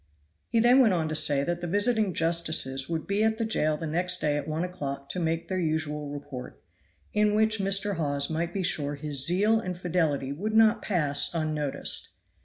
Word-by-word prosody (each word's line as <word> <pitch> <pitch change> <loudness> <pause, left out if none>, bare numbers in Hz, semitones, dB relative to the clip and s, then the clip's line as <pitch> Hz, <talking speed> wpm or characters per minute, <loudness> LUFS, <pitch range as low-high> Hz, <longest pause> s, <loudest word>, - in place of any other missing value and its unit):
He 230 - +2
then 245 +3 +5
went 220 -8 +5
on 160 -2 -1
to - - -3
say 145 -2 +3
that 175 +3 -2
the 175 - -3
visiting 205 +2 +2
justices 160 -5 0
would 165 -2 -3
be 200 +2 0
at 220 0 +1
the 225 - -1
jail 155 -8 0
the 165 - -5
next 180 +3 0
day 150 -2 0
at 145 0 -3
one 155 +2 -2
o'clock 140 -6 -5
to 185 - -3
make 165 0 -1
their 185 -1 -2
usual 155 -3 -2
report, 145 -3 -8 0.5
in 210 0 +2
which 220 0 +2
Mr. 195 0 +1
Hawes 145 -3 -1
might 165 +1 -2
be 190 +1 -3
sure 145 -4 0
his 145 -2 -4
zeal 210 +6 +3
and 185 -5 -5
fidelity 160 -6 -1
would 210 +10 -3
not 220 0 +5
pass 150 -8 +1
unnoticed. 155 -3 0
165 Hz, 200 wpm, -27 LUFS, 150-200 Hz, 0.5 s, then